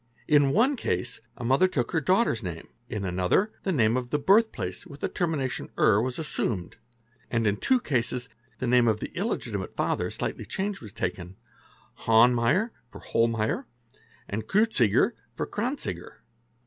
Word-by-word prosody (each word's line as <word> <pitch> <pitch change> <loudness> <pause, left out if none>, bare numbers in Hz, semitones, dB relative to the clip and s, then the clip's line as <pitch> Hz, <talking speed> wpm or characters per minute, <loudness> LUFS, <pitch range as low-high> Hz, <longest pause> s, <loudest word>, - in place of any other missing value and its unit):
In 145 -2 +5
one 240 - +3
case 90 - -2 0.2
a - - -7
mother 135 +10 +4
took 140 -11 -1
her 160 - +1
daughter's 185 - +2
name, 85 -4 -6 0.2
in 105 -4 -3
another 95 - +1
the 195 - -1
name 115 -8 +3
of 125 -1 -2
the 150 - +1
birth 200 +10 +4
place 90 -2 -5
with 140 - -11
| - - -31
the - - 0
termination 150 -7 -2
é7 105 0 +4
was 125 0 -3
assumed, 110 - -2 0.5
and 115 -2 0
in 105 -1 +2
two 255 - +2
cases 125 - -1 0.3
the 130 - -3
name 120 0 +4
of 110 -1 +2
the - - -5
illegi - - -3
timate - - -4
father - - 0
slightly - - -4
changed 195 +1 -3
was 110 - -9
taken,—Hohnmater 115 - 0 0.2
for - - -12
Hollmaier 115 -1 0 0.6
and 110 +2 -4
Kreuziger 195 - +3 0.2
for - - -2
Kranziger. - - -4
125 Hz, 160 wpm, -27 LUFS, 110-170 Hz, 0.6 s, In